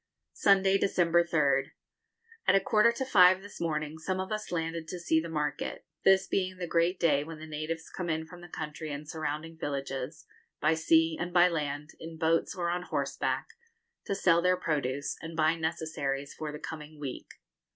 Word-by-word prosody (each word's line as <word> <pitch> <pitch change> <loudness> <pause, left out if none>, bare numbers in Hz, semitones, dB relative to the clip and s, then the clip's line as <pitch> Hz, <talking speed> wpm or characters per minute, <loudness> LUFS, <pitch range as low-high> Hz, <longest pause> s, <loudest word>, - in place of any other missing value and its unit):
Sunday, 195 0 +4
December 175 -2 +3
3rd. 140 -5 +1 0.7
At - - +6
a - - +6
quarter 210 +4 +4
to 250 +3 -3
five 185 -5 +6
this 205 - -10
morning 155 -1 -2
some 185 +3 -2
of 190 +2 -4
us 215 -2 -3
landed 165 -1 -2
to 180 - -5
see 160 -2 +2
the 170 - -6
market, 150 -3 -3 0.2
this 190 0 +5
being 185 -1 -1
the 180 - -3
great 170 +2 +1
day 145 -4 +3
when 160 +1 -8
the 155 - -9
natives 160 +1 -4
come 180 -2 -4
in 160 0 -1
from 175 +2 -12
the 175 - -10
country 155 -1 -6
and 145 +1 -6
surrounding 160 +1 -4
villages, 135 0 -4 0.3
by 155 +2 +3
sea 160 0 +3
and 175 +1 -3
by 175 0 +6
land, 150 -2 -3
in 160 0 -8
boats, 165 0 +1
or 175 -1 -1
on 180 +1 -1
horseback, 140 -5 -2 0.6
to 200 - 0
sell 170 -3 +4
their 180 +1 +3
produce, 145 -5 -1
and 165 0 -7
buy 155 0 +4
necessaries 160 -4 -3
for 155 -1 -5
the 150 - -6
coming 150 0 -8
week. 140 -3 -6
160 Hz, 185 wpm, -30 LUFS, 150-180 Hz, 0.7 s, At